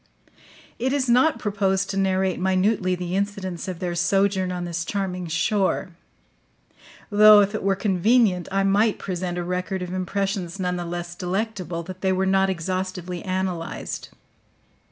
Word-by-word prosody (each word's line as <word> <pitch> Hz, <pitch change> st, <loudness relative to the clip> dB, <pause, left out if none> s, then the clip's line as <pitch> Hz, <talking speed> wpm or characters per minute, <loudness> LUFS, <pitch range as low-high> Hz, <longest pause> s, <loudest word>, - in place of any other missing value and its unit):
It 260 Hz, +3 st, 0 dB
is 275 Hz, -2 st, 0 dB
not 250 Hz, +3 st, +4 dB
proposed 195 Hz, -3 st, 0 dB
to -, -, -4 dB
narrate 190 Hz, -1 st, +1 dB
minutely 185 Hz, 0 st, +1 dB
the 180 Hz, 0 st, -4 dB
incidents 195 Hz, -3 st, -3 dB
of 185 Hz, -2 st, -4 dB
their 175 Hz, 0 st, -3 dB
sojourn 190 Hz, +2 st, +1 dB
on 180 Hz, -1 st, -3 dB
this 170 Hz, 0 st, -3 dB
charming 185 Hz, -1 st, -3 dB
shore; 185 Hz, +4 st, 0 dB, 1.2 s
though 210 Hz, 0 st, +8 dB
if 200 Hz, +1 st, 0 dB
it 215 Hz, -, -2 dB
were 195 Hz, 0 st, +1 dB
convenient 195 Hz, 0 st, +2 dB
I 195 Hz, 0 st, +1 dB
might 205 Hz, +2 st, +3 dB
present 180 Hz, -1 st, -4 dB
a 175 Hz, -, -2 dB
record 180 Hz, +1 st, -3 dB
of 180 Hz, 0 st, -6 dB
impressions 190 Hz, 0 st, -2 dB
nonetheless 175 Hz, -1 st, -3 dB
delectable 180 Hz, -2 st, -3 dB
that 185 Hz, +2 st, -9 dB
they 190 Hz, -, +2 dB
were 190 Hz, +1 st, +1 dB
not 190 Hz, 0 st, +3 dB
exhaustively 185 Hz, 0 st, -3 dB
analyzed. 185 Hz, -3 st, -3 dB
190 Hz, 145 wpm, -24 LUFS, 180-200 Hz, 1.2 s, though